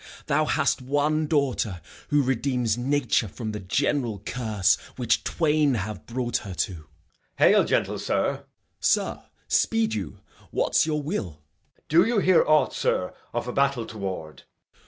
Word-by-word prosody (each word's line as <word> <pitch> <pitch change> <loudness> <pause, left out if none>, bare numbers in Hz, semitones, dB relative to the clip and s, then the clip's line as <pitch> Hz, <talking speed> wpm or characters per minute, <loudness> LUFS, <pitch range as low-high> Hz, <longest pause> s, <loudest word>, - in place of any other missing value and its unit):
Thou 155 +1 +2
hast 145 - +1
one 145 +4 0
daughter 130 - 0 0.3
Who 145 -1 +3
redeems 125 -3 0
nature 125 -2 +1
from 110 +3 -6
the 105 - -5
general 115 +3 0
curse 110 -7 +1 0.2
Which - - +1
twain 150 -4 +2
have 105 -1 -5
brought 120 0 -1
her 95 -3 -7
to. 95 - -1
Edg. 80 -2 -12 0.5
Hail, - - +5
gentle - - 0
sir. - - 0
Gent. - - -21 0.3
Sir, - - +1 0.2
speed 110 0 +2
you. 105 -3 -4 0.3
What's - - +2
your 150 -2 -1
will? 90 - -4 0.3
Edg. - - -32
Do 165 +3 +5
you 235 -1 +1
hear 185 -3 +5
aught, 155 0 +3
sir, 90 - -1 0.2
of 120 +1 -3
a 125 - -3
battle 140 -4 +1
toward? 95 -8 -6
125 Hz, 155 wpm, -25 LUFS, 105-145 Hz, 0.5 s, Hail